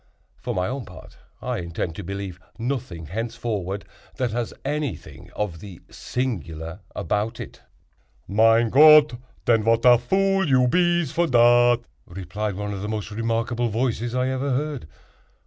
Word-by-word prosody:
For - - -5
my 90 0 0
own 130 -1 -4
part, 90 -4 -14 0.2
I - - -2
intend 85 -1 -4
to 100 - -6
believe 95 -1 -6 0.2
nothing 115 - -4
henceforward 105 0 -4 0.3
that 125 -4 -1
has 120 0 -2
anything 145 - -4
of 95 -6 -3
the 95 -2 -11
'singular' 85 - -4 0.2
about 105 +6 -2
it." - - -9 0.7
"Mein 115 +3 +4
Gott, 150 0 +8 0.3
den, 115 -2 +3
vat 115 +2 +2
a 120 -1 +8
vool 195 +7 +1
you 130 -2 +4
bees 175 0 +2
for 170 0 +1
dat!" 120 -1 +5 0.3
replied 95 +3 -4
one 105 +1 -4
of 95 - -5
the 105 - -4
most 110 -1 -4
remarkable 115 +2 -1
voices 120 +1 -1
I 130 0 +1
ever 130 +2 -2
heard. 145 - -3
115 Hz, 145 wpm, -23 LUFS, 100-130 Hz, 0.7 s, Gott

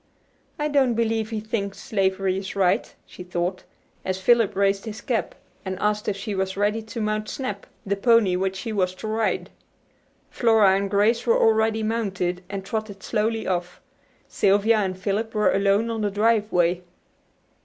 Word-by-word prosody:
"I 300 - 0
don't 275 -5 +2
believe 225 -1 0
he 220 -2 -3
thinks 210 -2 -3
slavery 195 -4 0
is 195 +1 -5
right," 190 -2 +1
she - - -12
thought, 180 +1 -3 0.4
as 185 0 -2
Philip 230 +2 +3
raised 195 +1 +1
his 220 -1 -6
cap, 240 -5 -2 0.3
and 190 -1 -4
asked 210 +1 -1
if 200 -2 -1
she 200 +1 -4
was 190 0 -2
ready 210 +2 +1
to 220 +1 -7
mount 215 0 -1
"Snap," 210 -7 -5 0.2
the 200 0 0
pony 215 -3 +4
which 190 +1 -1
she 220 +4 -5
was 185 -3 0
to 215 - -7
ride. 220 0 -1 0.8
Flora 220 -5 +4
and 200 0 -1
Grace 215 +5 +2
were 230 - +4
already 220 0 +2
mounted, 195 -5 -2
and 195 -1 -5
trotted 215 -3 -5
slowly 225 0 -1
off. 180 -1 -2 0.5
Sylvia 205 +3 +3
and 190 -3 -1
Philip 210 +4 -2
were 210 -2 +3
alone 200 +3 +2
on 225 -1 -3
the 205 - +1
driveway. 205 -5 +2
205 Hz, 165 wpm, -24 LUFS, 190-225 Hz, 0.8 s, pony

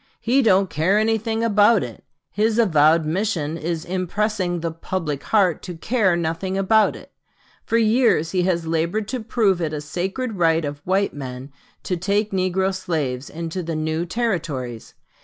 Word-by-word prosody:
He 255 +4 +2
don't 195 -5 +4
care 165 +5 +1
anything 225 +1 0
about 210 -1 +4
it. 120 -3 -9 0.3
His 220 +1 +1
avowed 160 -6 +4
mission 165 -2 -1
is 165 0 -3
impressing 185 0 -1
the 165 0 -2
'public 160 -3 -4
heart' 190 -6 +2
to 180 -2 -7
care 205 -1 +1
nothing 170 +3 -2
about 215 +3 +3
it.... - - -13 0.6
For 230 - +2
years 220 -7 +3
he 185 - +1
has 175 -2 0
labored 165 +6 -1
to 255 - -2
prove 215 -5 +1
it 155 -2 -2
a 150 - -2
sacred 190 - -4
right 165 -2 +2
of 145 0 -5
white 195 +2 +1
men 130 -1 -7 0.3
to 180 - -2
take 205 +4 0
negro 190 0 0
slaves 145 -8 -3
into 165 +2 -5
the 165 -1 -4
new 160 +2 -2
Territories. 165 - -3
185 Hz, 160 wpm, -22 LUFS, 160-210 Hz, 0.6 s, don't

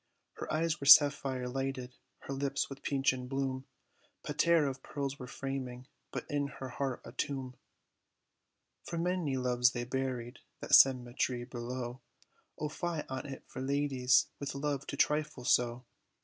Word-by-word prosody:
Her - - -5
eyes 165 +1 0
were 140 - -3
sapphire 140 -3 +7
lighted, 130 -1 -3 0.3
her 140 - -5
lips, 140 +1 -1
with 135 0 -8
peachen 135 -2 0
bloom, 135 0 -2 0.6
Paterre 170 -3 +3
of 135 -1 -3
pearls 140 -1 -4
were 125 - -7
framing, 130 -2 -5 0.2
but - - -5
in 145 -2 0
her 130 - -6
heart 130 0 -3
a - - -8
tomb; 130 -1 -3 1.3
For 170 - -5
many 170 -5 0
loves 125 0 +2
lay 120 - -1
buried, 125 -1 -3 0.2
that - - -7
cemet'ry 125 -1 +5
below 125 0 -5 0.6
O 150 - -2
fie 165 +1 -3
on 130 +2 -4
it 135 -1 -8
for - - -8
ladies, 135 -2 +3
with 140 -1 -4
love, 140 -1 -2
to 140 - -5
trifle 150 -4 +1
so. 120 +1 +2
135 Hz, 150 wpm, -32 LUFS, 125-140 Hz, 1.3 s, sapphire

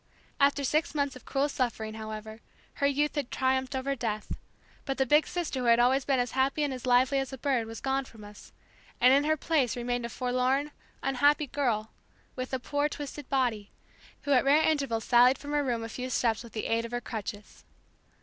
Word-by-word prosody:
After 280 0 +3
six 310 +4 0
months 280 -2 0
of 255 - -13
cruel 275 +1 0
suffering, 230 -6 -2
however, 220 0 -7 0.4
her 280 - +4
youth 290 +2 +1
had 285 -4 -3
triumphed 260 +1 0
over 270 +1 -1
death; 215 -4 -4 0.5
but 270 - -3
the 265 - +2
big 300 +4 +4
sister 345 -7 -3
who 250 - -2
had 235 0 +6
always 260 +2 +3
been 275 -2 +2
as 245 -1 0
happy 270 +3 +1
and 285 -2 -1
as 255 0 -6
lively 255 +3 +4
as 270 -1 -3
a 265 - -6
bird 255 -4 0
was 225 0 -8
gone 270 0 0
from 225 -4 -14
us, 205 0 -13 0.5
and 250 +1 +6
in 280 +2 +4
her 310 +1 +2
place 290 -5 +1
remained 245 0 -2
a - - -11
forlorn, 255 +4 0 0.3
unhappy 285 +3 +3
girl 240 -6 -1 0.4
with 255 0 -5
a 260 - 0
poor 290 +3 -1
twisted 290 -1 -7
body, 240 -7 0 0.5
who 285 - -2
at 255 -3 +5
rare 290 +3 +4
intervals 275 -8 0
sallied 250 +2 +5
from 290 - -8
her 295 0 +1
room 240 -4 -1
a - - -4
few 255 +3 -5
steps 230 -3 0
with 235 - -13
the 215 - -3
aid 230 0 +1
of 230 - -6
her 240 +1 -2
crutches. 215 -2 -7
260 Hz, 210 wpm, -29 LUFS, 235-280 Hz, 0.5 s, had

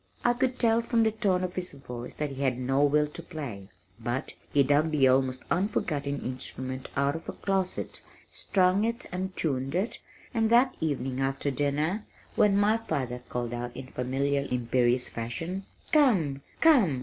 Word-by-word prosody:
I 240 - +5
could 255 +1 0
tell 230 -1 +3
from 230 0 +2
the 220 - +3
tone 200 -4 +1
of 180 -1 -3
his 180 -3 -1
voice 125 -3 -8
that 150 -1 -2
he 135 0 -6
had 130 -3 +1
no 135 +2 +1
will 150 +1 +4
to 160 - -6
play, 140 - -7 0.3
but - - -3 0.2
he 140 - +5
dug 145 +4 +3
the 145 -4 +4
almost 130 0 +2
forgotten 150 -7 -1
instrument 130 0 -3
out 140 +1 +1
of 165 - -7
a - - -3
closet, 190 -2 -1 0.3
strung 185 +1 +2
it 230 +2 0
and 185 +1 -4
tuned 135 -1 -1
it, 195 +6 -1 0.3
and 225 -1 +2
that 245 +3 +5
evening 135 -4 -1
after 135 +1 0
dinner, 150 - 0 0.3
when 205 -1 +4
my 210 +2 +4
father 130 - -3
called 120 -1 -3
out 120 0 -5
in 130 0 -7
familiar 140 +2 0
imperious 125 0 +1
fashion, 165 +12 -4 0.2
"Come, 190 - +3 0.2
come! 230 - +5
145 Hz, 170 wpm, -28 LUFS, 130-195 Hz, 0.3 s, I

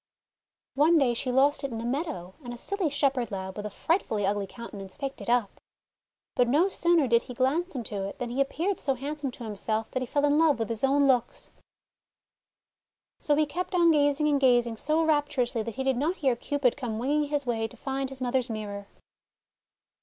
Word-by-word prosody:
One 310 +5 +4
day 265 -5 +3
she 250 +2 -2
lost 275 +3 +3
it 275 - -3
in 225 - -4
a 230 - -5
meadow, 255 - -3
and 245 - -6
a - - -11
silly 385 +5 -1
shepherd 275 -4 0
lad, 190 -2 -5
with 210 0 -4
a - - -6
frightfully 220 - 0
ugly 200 0 0
counte 235 +4 -10
nance, 195 -2 -9
picked 275 -1 -5
it - - -5
up. 240 -4 +1 0.7
But 245 - +2
no 310 +10 +3
sooner 340 -5 +2
did 235 0 +4
he 250 - -10
glance 295 +8 0
into 210 -5 -3
it 200 - -7
than 240 -1 -4
he 265 +3 0
appeared 345 +8 -1
so 270 -2 0
handsome 285 +2 -4
to 245 - -10
him 215 -2 -5
self 220 +2 -2
that 255 - -2
he 255 - -3
fell 285 +4 +1
in 290 +1 +3
love 320 -3 +4
with 225 -2 -2
his 230 +1 -4
own 280 +1 +4
looks; 245 -3 0 1.7
So 295 - +1
he 305 +1 +3
kept 360 +5 -4
on 340 -2 +5
gazing 290 0 +3
and 285 -2 +2
gazing 240 -3 +3
so 310 +6 +1
raptur 290 -4 +2
ously 235 -1 -3
that 230 0 -5
he 265 - -2
did 265 -2 +1
not 310 +7 0
hear 265 -7 +1
Cupid 270 0 0
come 245 -6 -4
winging 290 +6 +1
his 290 -1 -2
way 225 -2 -1
to - - -16
find 270 0 -3
his 270 -1 -9
mother's 255 0 0
mirror. 205 -2 -5
265 Hz, 215 wpm, -27 LUFS, 230-290 Hz, 1.7 s, on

